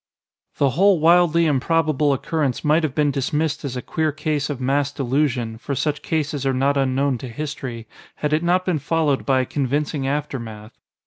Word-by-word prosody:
The 140 -2 +2
whole 190 +4 +4
wildly 170 0 +4
improbable 155 0 +1
occurrence 140 -1 -1
might 155 +2 +3
have 155 -5 -2
been 150 -2 +2
dismissed 150 +3 -1
as 130 -3 -4
a 125 - -5
queer 160 -1 -1
case 150 -1 -2
of 145 -3 -4
mass 140 +2 0
delusion, 130 -4 -1
for 140 +3 -4
such 150 +2 -1
cases 150 -3 -2
are 135 -1 +1
not 140 +2 +2
unknown 135 -1 +1
to 130 - -7
history, 125 -3 -6 0.3
had 150 0 -2
it 155 - +2
not 180 +2 +1
been 175 -5 0
followed 150 -1 0
by 130 -1 +3
a - - -2
convincing 140 +1 -1
aftermath. 115 -7 -4
145 Hz, 180 wpm, -22 LUFS, 130-155 Hz, 0.3 s, whole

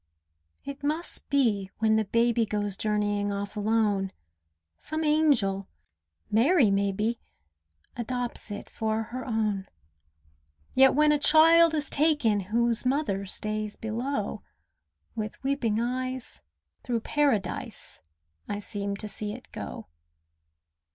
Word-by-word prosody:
It 280 0 -7
must 310 +4 -1
be 225 -9 +2
when 220 0 +3
the 220 0 +2
baby 230 +2 +2
Goes 205 -2 -2
journeying 205 -1 0
off 200 +1 -4
alone, 210 -2 +1 0.7
Some 315 +1 -3
angel 280 -11 +2 0.6
(Mary, 245 - +4
may 200 0 +2
be) 215 +4 -1 0.8
Adopts 245 -1 -3
it 205 - -6
for 220 0 -2
her 250 +3 -6
own. 215 -4 -1 1.1
Yet 265 0 +6
when 300 +1 +5
a 295 - +2
child 325 +2 +6
is 300 0 +1
taken 290 -9 +2
Whose 230 +4 0
mother 255 -8 0
stays 215 +1 -2
below, 225 -1 -3 0.7
With 215 +2 -5
weeping 265 -6 0
eyes, 255 - -3 0.4
through 235 -2 -2
Paradise, 280 -6 -1 0.5
I 205 - -2
seem 200 -1 -4
to 215 +1 -6
see 210 0 -4
it 250 - -12
go. - - -7
225 Hz, 115 wpm, -27 LUFS, 205-270 Hz, 1.1 s, Yet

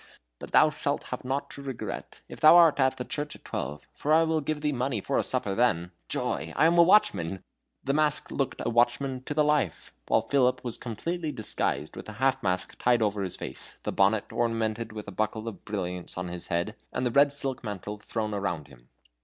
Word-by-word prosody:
But - - -9
thou - - +6
shalt - - -2
have - - -5
naught 135 +2 -2
to 140 - -8
regret, 135 -3 -6
if - - -10
thou 155 +3 +8
art 165 -4 +6
at 130 -1 +3
the 125 - -4
church 145 +2 -4
at - - -17
twelve, 70 +3 -4
for 150 - -2
I 160 +1 +6
will 160 -1 +1
give 150 +1 -2
thee 150 0 +1
money 130 -3 -1
for - - 0
a - - +1
supper 100 - 0
then. 95 -6 +1 0.2
Joy! 80 - -2
I - - +4
am 170 +1 +4
a - - +11
watchman!" 100 - +3 0.4
The 140 - 0
mask 150 0 +1
looked 135 - -2
a - - +1
watchman 125 +2 +1
to 145 - -4
the 150 - +4
life, 150 - 0
while - - +3
Philip 130 -3 +2
was 120 -3 -3
completely 155 +8 -3
disguised 110 - -2
with - - -8
the 110 - -7
half 135 +4 +1
mask 90 -1 -2
tied 120 -2 +3
over 105 -1 0
his 95 -2 -2
face, - - -7
the - - -2
bonnet 100 +2 +2
ornamented 115 -1 -1
with 110 -1 -7
a - - -5
buckle 110 +1 -2
of 115 - -7
brilliants 90 -4 -4
on 90 0 -3
his 85 0 -6
head, 85 +6 -1 0.2
and 125 - -2
the 120 - +1
red 140 +3 +5
silk 135 -3 -3
mantle 105 -1 -5
thrown 110 0 -3
around 90 -7 -3
him. - - -18
120 Hz, 220 wpm, -28 LUFS, 100-140 Hz, 0.4 s, a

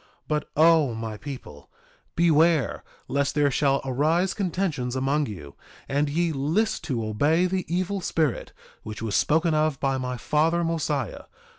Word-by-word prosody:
2:32 - - -31 0.2
But, 150 -1 -1
O 155 -6 +5
my 110 -1 -5
people, 115 - -9 0.5
beware 165 -3 +3 0.2
lest 140 +1 0
there 145 -1 +3
shall 140 0 +2
arise 155 +8 +1
contentions 170 - -2
among 140 +3 0
you, 75 -10 -9 0.3
and 145 +2 0
ye 170 +3 0
list 160 +10 0
to 120 -7 -2
obey 145 +11 +2
the 185 -2 -2
evil 185 +2 -1
spirit, 155 -6 -1 0.3
which 110 +1 -7
was 110 -2 -2
spoken 160 +2 +2
of 155 -2 +1
by 135 -1 0
my 125 -1 -3
father 160 +7 +1
Mosiah. 150 - -2
150 Hz, 150 wpm, -25 LUFS, 130-165 Hz, 0.5 s, O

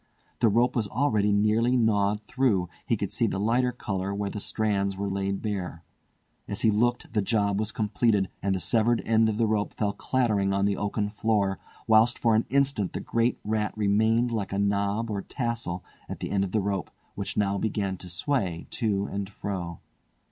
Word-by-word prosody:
The 115 - +4
rope 120 +4 +2
was 115 -4 0
already 110 -3 +1
nearly 110 +5 +3
gnawed 105 -2 +2
through—he 105 -7 0
could - - -3
see - - +1
the 95 - -2
lighter 120 +4 +2
colour 100 -5 -3
where 100 -1 -2
the 105 - -5
strands 100 -2 -1
were 100 0 -2
laid 100 0 -2
bare. 95 -6 -3 0.6
As - - -4
he 110 - +4
looked 120 +4 0
the 105 - +2
job 100 -1 +1
was 110 0 -1
completed, 105 -2 +1
and 95 -1 +1
the - - -1
severed 115 +4 +2
end 110 0 +3
of 105 - -2
the 115 - +3
rope 105 -1 -1
fell 100 -2 0
clattering 105 -7 +1
on 100 0 +2
the 100 -1 +1
oaken 105 0 -1
floor, 105 -3 0 0.3
whilst 110 +2 +4
for 115 -2 +2
an 110 +1 +2
instant 135 -8 +1
the - - -3
great 115 +1 0
rat 105 0 -1
remained 110 +3 +2
like 105 -4 -2
a 100 - -2
knob 100 +2 0
or 100 -1 -2
tassel 115 -7 -3 0.3
at - - -5
the - - -4
end 100 -1 +2
of 95 - -3
the 110 - +1
rope, 100 -2 -2 0.2
which 100 - -5
now 100 -1 +1
began 100 -3 -1
to 90 - -9
sway 90 -2 -1
to 100 -4 0
and 100 -1 -4
fro. 90 -5 -5
105 Hz, 190 wpm, -27 LUFS, 100-115 Hz, 0.6 s, The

